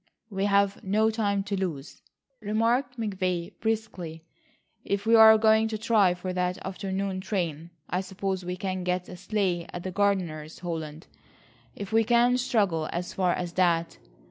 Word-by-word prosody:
"We've 200 0 +1
no 215 +3 +2
time 205 -3 0
to 200 0 -3
lose," 170 -7 -4 0.4
remarked 230 +4 0
McVay 185 -5 -2
briskly, 190 -8 -3 0.6
"if 200 +1 -2
we 225 - +3
are 220 -1 +9
going 220 0 +4
to 220 -1 -3
try 210 -4 +3
for 185 +1 -5
that 180 0 -1
afternoon 190 0 -3
train. 170 -5 -3 0.2
I 180 - -1
suppose 190 0 -3
we 180 +1 -4
can 185 -1 -3
get 180 0 -1
a - - -8
sleigh 180 -3 -1
at 175 - -6
the 185 - -4
gardener's, 180 -6 -1
Holland, 160 -3 -5 0.7
if 200 +1 -7
we 225 0 +5
can 240 +2 +3
struggle 200 -10 +1
as 175 +1 -4
far 185 -2 +1
as 175 -1 -4
that. 170 -2 +1
190 Hz, 155 wpm, -27 LUFS, 180-215 Hz, 0.7 s, are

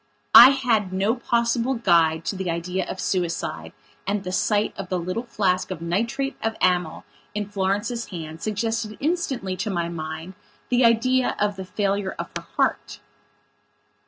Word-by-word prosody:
I 245 +2 +12
had 235 -8 +1
no 195 +4 +1
possible 235 +1 0
guide 165 -7 +3
to - - -2
the 190 -1 -3
idea 180 +3 -2
of - - -5
suicide 170 - -2 0.4
and 200 0 -1
the 185 - -4
sight 205 +3 +1
of 195 -2 -7
the 185 - 0
little 185 +6 -3
flask 185 -5 0
of 185 -4 -5
nitrate 230 +11 -1
of 225 0 -1
amyl 180 -3 +1 0.3
in 210 -1 -2
Florence's 205 +4 -1
hand 160 -2 -7
suggested 215 0 -2
instantly 280 - -1
to 200 +4 -2
my 170 -3 -1
mind 160 +2 -6 0.4
the 250 0 +3
idea 245 +2 +3
of 205 -1 0
the 190 -1 -7
failure 200 0 -1
of - - -6
her - - -6
heart. 105 0 0
195 Hz, 160 wpm, -24 LUFS, 180-230 Hz, 0.4 s, I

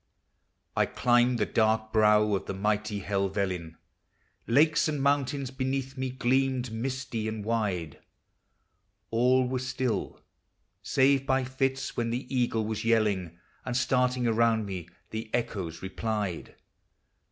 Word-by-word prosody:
] - - -48 0.3
I - - +3
climbed 120 0 +3
the 105 - +1
dark 110 0 +1
brow 105 -1 +4
of 95 - -2
the 100 - -3
mighty 105 +1 -1
Helvellyn, 95 -4 -2 0.7
Lakes 150 +7 +4
and 150 -2 -1
mountains 140 -1 0
beneath 130 0 -2
me 130 -1 -2
gleamed 130 -1 0
misty 120 -1 -3
and 110 -2 -4
wide: 100 -9 -1 1.1
All 125 +2 +3
was 130 0 -2
still, 125 -3 -2 0.6
save, 135 0 +2
by 130 0 +2
fits, 135 +1 -2
when 115 -1 -1
the 120 +3 -3
eagle 120 -3 +1
was 110 0 -3
yelling, 105 -7 +1 0.3
And 125 -1 -2
starting 125 -1 +1
around 115 -1 +2
me 90 -4 -6 0.2
the 110 0 -5
echoes 95 -9 -3
replied. 100 -1 -3
115 Hz, 130 wpm, -28 LUFS, 105-130 Hz, 1.1 s, brow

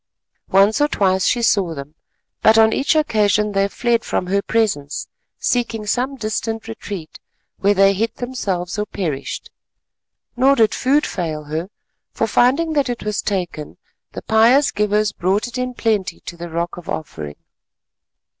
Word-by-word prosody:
Once 200 +7 +4
or 295 - +5
twice 190 -8 +1
she 240 -1 +1
saw 190 -7 +2
them, 140 +1 -8 0.5
but 220 +1 +5
on 220 0 +5
each 280 - +1
occasion 210 -8 +2
they 195 0 +2
fled 235 +2 0
from - - -1
her 200 +2 +1
presence—seeking 220 - -2
some 250 +6 -1
distant 225 -1 -3
retreat, 200 -7 -7 0.4
where 200 +1 +3
they 195 0 +5
hid 225 +4 -1
themselves 200 -8 -3
or 210 - 0
perished. 155 -9 -4 0.8
Nor 265 +3 +4
did 220 -3 +3
food 285 +4 +2
fail 160 -4 -3
her, 155 +5 -4 0.4
for - - 0
finding 270 +9 +2
that 285 -3 +1
it 240 - -4
was 210 -1 -1
taken, 175 -7 -4 0.4
the - - -7
pious 235 +6 +4
givers 210 0 +1
brought 190 +3 0
it 245 0 -5
in 250 0 -3
plenty 215 -6 -1
to 175 - -8
the 170 0 -7
Rock 170 +1 -3
of 175 - -10
Offering. 75 - -5
210 Hz, 155 wpm, -20 LUFS, 185-235 Hz, 0.8 s, or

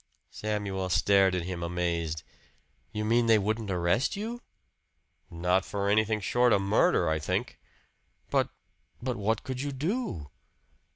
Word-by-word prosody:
Samuel 100 -3 -3
stared 95 +2 +4
at 90 - -1
him, 90 -1 -5
amazed. 85 -2 -2 0.7
"You 105 0 -3
mean 115 +1 +3
they 110 -1 +6
wouldn't 110 +1 -1
arrest 90 +7 +1
you?" 230 +4 -5 0.9
"Not 90 +2 +1
for 100 0 -2
anything 110 +1 +2
short 120 +3 +3
of 100 - +2
murder, 100 +2 +3
I 80 0 +1
think." 75 - -2 0.7
"But - - +2 0.5
but 125 0 -2
what 110 0 -1
could 130 -1 -4
you 145 0 -2
do?" 145 - -3
100 Hz, 135 wpm, -29 LUFS, 90-115 Hz, 0.9 s, they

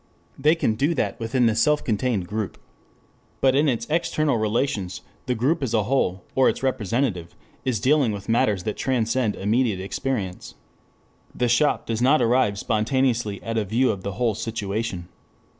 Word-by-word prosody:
They 150 +4 +4
can 140 -9 +1
do 145 +9 0
that - - -1
within 120 +2 +1
the 115 - +3
self 150 +7 +2
contained 110 -4 -1
group. 105 0 -4 0.8
But 130 -1 +4
in 145 +2 +3
its 115 -2 -1
external 155 -3 +1
relations 110 -4 -1 0.3
the 125 - +1
group 145 +8 +1
as 120 -4 -1
a 110 - +2
whole, 100 -7 0
or 130 -1 +4
its - - -4
representative, 115 -7 -1 0.3
is 125 -5 0
dealing 135 +1 +3
with 100 -2 -6
matters 105 -5 +1
that 105 - -3
transcend 120 -3 0
immediate 110 0 +1
experience. 100 -1 -4 0.8
The 125 - +1
shop 120 +5 +2
does 115 0 -2
not 135 +5 +4
arrive 120 -3 +2
spontaneously 115 -1 0
at 115 0 -1
a - - 0
view 115 +6 +2
of 100 -3 -5
the 100 +1 -4
whole 115 +3 0
situation. 105 -4 -4
115 Hz, 165 wpm, -24 LUFS, 105-130 Hz, 0.8 s, They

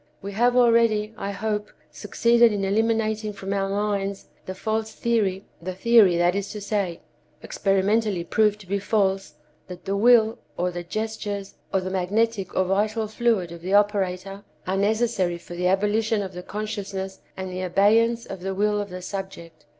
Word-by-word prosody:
We 200 - -6
have 240 +4 +2
already, 230 -3 +3
I 200 - -4
hope, 210 +1 -2 0.2
succeeded 235 +5 +3
in 200 -2 -1
eliminating 220 +1 0
from 195 0 -4
our 195 -1 0
minds 200 -1 -2 0.2
the 185 - -5
false 220 +2 -2
theory—the 195 -5 -2
theory, 210 -4 +5
that 175 +1 +3
is 200 0 -3
to 210 - -5
say, 200 -4 -2 0.4
experimentally 195 -1 +1
proved 210 +3 +2
to 190 - -15
be 200 +2 -1
false—that 185 -5 -3
the 195 - -1
will, 225 +1 +4 0.2
or 180 +1 0
the 175 0 -5
gestures, 205 +1 -4 0.2
or 190 - +1
the 185 0 -4
magnetic 200 +2 0
or 185 - +3
vital 210 +4 0
fluid 215 -5 0
of 170 -1 -9
the 190 +3 0
operator 195 -1 0 0.2
are 185 - -1
necessary 205 -3 +1
for 170 - -11
the 180 +1 0
abolition 210 +3 +1
of 190 -1 -7
the 180 - -6
consciousness 195 -1 -5 0.2
and 190 -1 -5
the 180 0 -4
abeyance 220 +6 +3
of 195 - -7
the 190 +1 -3
will 210 +1 +1
of 205 - -6
the 180 0 -7
subject. 170 -6 -7
200 Hz, 165 wpm, -24 LUFS, 190-215 Hz, 0.4 s, theory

